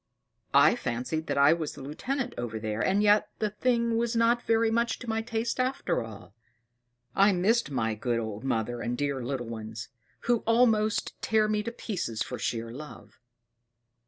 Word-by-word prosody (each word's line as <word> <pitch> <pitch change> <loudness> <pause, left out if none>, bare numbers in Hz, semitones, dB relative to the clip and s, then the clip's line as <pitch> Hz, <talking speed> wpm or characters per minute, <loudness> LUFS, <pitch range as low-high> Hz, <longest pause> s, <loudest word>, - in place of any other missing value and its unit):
I - - +7
fancied 125 +7 -3
that - - -1
I 140 +3 +6
was 160 -3 -3
the - - -9
lieutenant 250 - -3
over 115 -2 -4
there: 110 0 -3
and 200 +2 +2
yet 210 0 +4
the 215 -1 -1
thing 235 +1 +1
was 235 0 0
not 230 +1 +3
very 225 -1 +2
much 235 0 +1
to 250 - -10
my 225 0 0
taste 230 +1 -2
after 255 - 0
all. 105 -2 -11 0.8
I 200 +1 +5
missed 210 +5 +2
my 115 -5 0
good 120 +2 -1
old 110 0 -5
mother 120 -2 -1
and 120 - -2
the - - -3
dear 135 -3 -2
little 125 0 -3
ones; 110 -1 -7 0.3
who 240 0 +2
almost 225 -2 +2
tear 220 -1 +2
me 210 0 +1
to 235 - -4
pieces 180 - -3
for 125 - -6
sheer 115 0 -2
love." 150 +5 -11
190 Hz, 180 wpm, -28 LUFS, -, 0.8 s, I